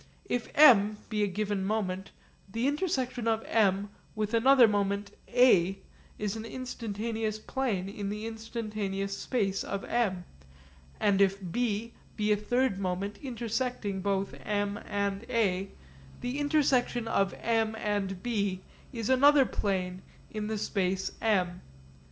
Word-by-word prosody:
If 245 -1 -2
M 215 -8 +7
be 215 -1 -1
a 205 - +3
given 200 0 -2
moment, 190 -2 -2 0.4
the 230 +5 -1
intersection 260 -6 -1
of 225 0 +1
M 200 -2 +2 0.2
with 215 +1 -2
another 250 +1 +6
moment 200 -1 0 0.2
A 195 -7 +4 0.4
is 210 0 -2
an 220 - -5
instantaneous 225 -3 -3
plane 215 -5 -2
in 200 0 -4
the 210 +2 -4
instantaneous 215 -3 -4
space 195 -6 -1
of 200 0 -4
M; 200 -7 0 0.8
and 200 -2 +3
if 195 0 +4
B 230 0 -1 0.2
be 210 -1 +1
a - - +6
third 230 0 0
moment 195 +2 -3
intersecting 235 -5 -2
both 195 0 -1
M 205 0 -1
and 200 0 -1
A, 195 -4 +1 0.5
the 250 +3 -3
intersection 270 -5 +2
of 195 -3 +1
M 225 -1 0
and 200 -3 -2
B 200 -6 -1 0.3
is 230 -5 -4
another 275 +1 +6
plane 185 -4 -2 0.3
in 215 -1 -3
the 220 0 -2
space 190 -2 -1
M. 180 -5 +1
210 Hz, 135 wpm, -29 LUFS, 195-235 Hz, 0.8 s, M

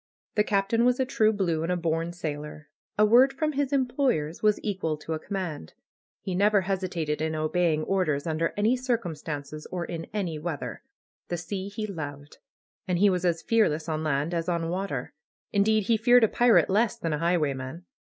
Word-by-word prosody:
The 210 - +3
Captain 210 +3 +1
was 250 +1 +3
a 260 - +2
true 220 -4 +3
blue, 180 -7 0
and 165 +2 -1
a 180 - +1
born 165 0 -1
sailor. 150 -3 -6 0.3
A 210 - +6
word 245 +5 +6
from 305 +3 -1
his 285 -1 -1
employers 250 - 0
was 210 -1 +3
equal 185 -7 -2
to 160 +2 -5
a 155 - -3
command. 175 - -5 0.5
He 190 - -4
never 200 +2 +3
hesitated 180 -5 -2
in 160 0 -1
obeying 155 0 +1
orders 155 -6 0
under 165 0 0
any 215 +4 +3
circumstances 160 - -4
or 175 -2 -3
in 165 -1 -5
any 180 -7 -3
weather. 155 -2 -5 0.5
The 175 - -2
sea 190 +3 -5
he 215 +1 -4
loved. 145 -7 -7 0.5
And 180 -1 +1
he 200 +2 +5
was 180 -1 -1
as 170 -2 0
fearless 170 -9 +2
on 155 -1 -2
land 150 +2 0
as 170 +1 -1
on 170 -1 -1
water. 190 +3 -3 0.4
Indeed, 215 +1 +3
he 225 +3 +2
feared 245 +2 +5
a - - +6
pirate 240 +1 +4
less 225 +3 +2
than 165 -8 -2
a 150 - -1
highwayman. 155 -2 -1
180 Hz, 185 wpm, -27 LUFS, 155-215 Hz, 0.5 s, A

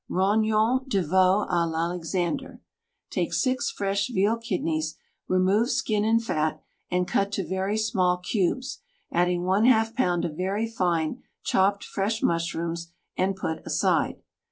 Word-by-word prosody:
ROGNONS 215 +5 +2
DE 200 -8 +1
VEAU 185 +4 +3
A 175 -1 +1
L'ALEXANDER 170 +1 -2 0.5
Take - - -1
six 255 -1 +1
fresh 200 0 -1
veal 210 -1 +2
kidneys, 165 -9 -2 0.3
remove 190 +6 +2
skin 210 -5 0
and 225 +1 +2
fat, 155 -7 0 0.3
and 180 0 0
cut 200 +2 +1
to 195 -2 -1
very 190 +4 -1
small 190 -5 +1
cubes, 200 +7 -1 0.3
adding 175 0 +1
Yz 220 +4 +3
pound 175 -8 +1
of 155 -3 -4
very 195 +6 -1
fine 175 -8 -1 0.2
chopped 200 +1 +2
fresh 210 +3 -2
mushrooms, 170 0 -1 0.2
and 190 +1 0
put 160 -4 -4
aside. - - 0
190 Hz, 130 wpm, -26 LUFS, 175-215 Hz, 0.5 s, VEAU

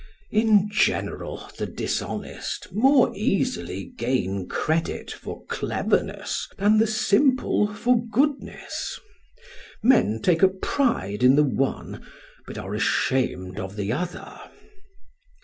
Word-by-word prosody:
In 215 -2 +4
general 210 - -1
the - - -2
dishonest - - -4
more 260 +5 +4
easily 255 +4 -1
gain 125 - -2
credit 160 +1 -1
for - - -8
cleverness - - -1
than 210 +2 +4
the 225 - +4
simple 220 0 +2
for 240 +3 +1
goodness; 275 +6 -2 0.8
men 115 - +4
take 165 +7 +2
a 190 - +8
pride 190 - -1
in 130 +2 +6
the 150 - +5
one, 135 -1 -2 0.4
but - - -8
are - - -5
ashamed 95 -8 0
of 95 +1 -6
the 105 0 -2
other. 175 +5 -5
200 Hz, 110 wpm, -24 LUFS, -, 0.8 s, a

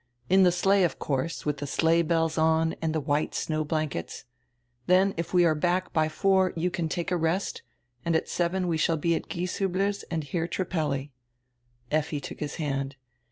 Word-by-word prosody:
In 190 +1 +6
the 180 -1 +6
sleigh, 195 +3 +3
of 175 - 0
course, 140 +4 -2
with 150 -1 0
tire 145 +1 -5
sleigh 165 +4 +3
bells 165 -1 +1
on 160 0 +2
and 160 -1 0
the 155 - 0
white 145 +1 -1
snow 155 -1 -1
blankets. 155 - -3 0.6
Then 190 +2 +4
if 170 0 -4
we 180 -1 +5
are 160 - +4
back 180 +4 0
by 155 -2 +2
four 190 +3 +2
you 175 +2 0
can 165 -2 -2
take 175 +2 -3
a - - +3
rest, 165 +4 -1 0.4
and 170 -1 +1
at 160 - +1
seven 180 +1 0
we 165 -2 +1
shall 165 +1 +2
be 170 +2 +1
at - - -3
Gieshiibler's 195 +3 -1
and 160 -2 -2
hear 165 +3 -2
Trippelli." 150 -6 -2 0.8
Effi 155 0 0
took - - -8
his 150 -1 -4
hand. 140 -3 -2
165 Hz, 190 wpm, -27 LUFS, 155-180 Hz, 0.8 s, In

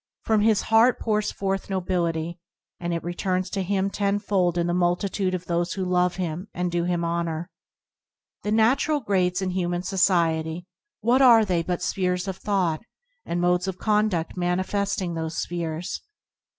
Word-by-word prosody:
From 220 -2 +2
his 215 -1 +3
heart 225 +3 +4
pours 215 -2 0
forth 195 0 -3
nobility, 170 -3 -1 0.4
and 175 0 -3
it 170 -1 -2
returns 185 +1 -2
to 195 - -1
him 195 +1 0
tenfold 200 -3 0
in 170 - +1
the 175 - 0
multitude 185 +2 0
of 180 0 -6
those 170 0 -1
who 190 -2 -2
love 180 0 +2
him 180 +1 -4
and 180 0 -1
do 175 0 0
him 175 -1 0
honour. 170 0 -2 0.9
The 210 - -2
natural 250 +7 +3
grades 190 -5 0
in 185 - -1
human 175 -1 -1
society 170 -3 +1 0.2
— 335 - -63
what 245 +4 +3
are 235 -4 +7
they 180 -4 +1
but 180 +1 -3
spheres 180 0 -1
of 190 -1 -3
thought, 185 -6 0 0.5
and 175 - -1
modes 180 +1 +2
of 190 -1 -3
condudt 210 -5 +1
manifesting 185 +1 -1
those 160 0 -4
spheres 170 -1 -3
180 Hz, 165 wpm, -25 LUFS, 175-200 Hz, 0.9 s, are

